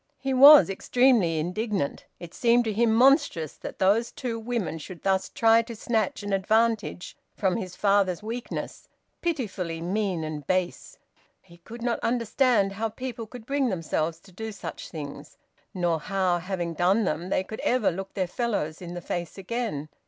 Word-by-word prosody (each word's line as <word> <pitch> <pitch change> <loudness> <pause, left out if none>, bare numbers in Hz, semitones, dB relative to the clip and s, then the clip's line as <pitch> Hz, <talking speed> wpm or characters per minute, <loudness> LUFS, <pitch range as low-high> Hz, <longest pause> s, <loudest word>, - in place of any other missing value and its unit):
He 270 0 -2
was 280 +3 +9
extremely 200 -3 +2
indignant. 185 0 -2
It 175 -1 -10
seemed 240 0 +3
to 220 - -1
him 230 +2 +2
monstrous 250 - +3
that - - -8
those 210 +5 +2
two 235 -3 -4
women 225 -8 -3
should 170 +3 -10
thus 190 -1 +1
try 225 0 +4
to 230 0 -8
snatch 220 -2 -1
an 205 -1 -3
advantage 215 0 0 0.2
from 190 -3 0
his 185 -5 -6
father's 200 -2 +2
weakness, 230 +3 -6 0.3
pitifully 200 - -3
mean 185 -1 -1
and 150 -3 -6
base. 185 -1 -2 0.4
He 170 -2 -19
could 230 +7 -10
not 240 -1 0
understand 230 -3 +2
how 220 +3 -2
people 235 -1 -6
could 235 0 -11
bring 275 -1 0
themselves 165 -3 -2
to 195 - -18
do 220 +4 -6
such 205 - -8
things, 145 -4 -8 0.3
nor 175 -3 0
how, 185 0 0
having 175 -1 -3
done 185 +7 +2
them, 175 0 -2
they 190 - +1
could 220 +3 -8
ever 250 -4 +2
look 190 +3 -7
their 190 - 0
fellows 180 -6 -2
in 175 0 -7
the 175 - -5
face 175 +1 -5
again. 195 -7 -3
200 Hz, 165 wpm, -26 LUFS, 175-230 Hz, 0.4 s, was